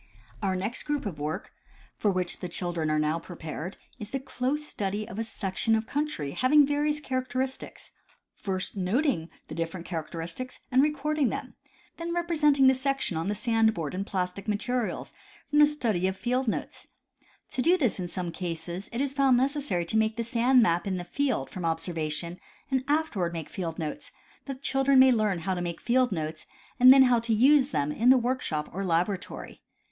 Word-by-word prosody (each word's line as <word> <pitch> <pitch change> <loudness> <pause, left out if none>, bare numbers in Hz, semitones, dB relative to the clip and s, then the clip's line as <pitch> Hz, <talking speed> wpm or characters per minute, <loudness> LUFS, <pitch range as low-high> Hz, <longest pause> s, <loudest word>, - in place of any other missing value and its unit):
Our 190 -2 0
next 210 +7 -2
group 295 -3 -2
of 175 -8 -5
work, 150 +2 -4 0.4
for 210 - +1
which 180 -2 -1
the 180 - -5
children 170 -3 -2
are 155 - +2
now 155 +2 +1
pre 175 +1 -10
pared, 160 +3 -6 0.2
is 210 -2 -7
the 270 - -2
close 270 +3 -2
study 205 -4 -3
of 220 -2 -7
a - - 0
section 225 0 0
of 220 0 -1
country 285 - -2
having 285 - +5
various 295 +1 0
characteristics, 260 -1 -3 0.4
first 190 0 -4
noting 195 - 0 0.2
the - - -7
different 165 +2 -4
characteristics 170 +8 -4
and 255 +1 +5
recording 300 -2 +1
them, - - -5 0.4
then 340 0 -3
representing 300 -5 +3
the 265 - +7
section 270 -7 -1
on 165 +3 -2
the 205 - 0
sand 225 0 +2
board 155 -4 -3
in 190 +2 -2
plastic 190 0 -3
materials 230 +3 -2 0.4
from 295 - +4
the 295 - +8
study 225 -11 0
of 190 - -2
the - - -20
field 250 +1 0
notes. 220 - -3 0.6
To 255 - -1
do 345 +7 +4
this 250 - +1
in 180 - -3
some 175 -1 -4
cases 170 +2 -5
it 235 - -2
is 280 -1 -1
found 270 -3 +4
necessary 265 - 0
to 195 +6 0
make 220 0 +1
the 230 - 0
sand 240 +2 +4
map 175 -3 +1
in 190 -1 -1
the 175 - -4
field 245 - -1
from 185 - -6
observation 165 0 -2 0.3
and 260 -1 +1
afterwards 285 - 0
make 165 -2 -5
field 170 -4 -4
notes, 155 -3 -5 0.3
that 275 - -4
the 260 +1 -15
children 270 0 +3
may 260 0 +8
learn 210 -7 +1
how 190 +3 -1
to 180 - -3
make 170 -1 -4
field 250 0 +2
notes, 155 -3 -4 0.3
and 255 +1 +10
then 270 0 +8
how 250 -2 +4
to 230 -1 0
use 275 +4 +5
them 145 - 0
in 230 +10 +2
the 260 - +8
workshop 240 -12 -1
or 195 +3 -3
laboratory. 180 +2 -2
220 Hz, 195 wpm, -28 LUFS, 175-265 Hz, 0.6 s, and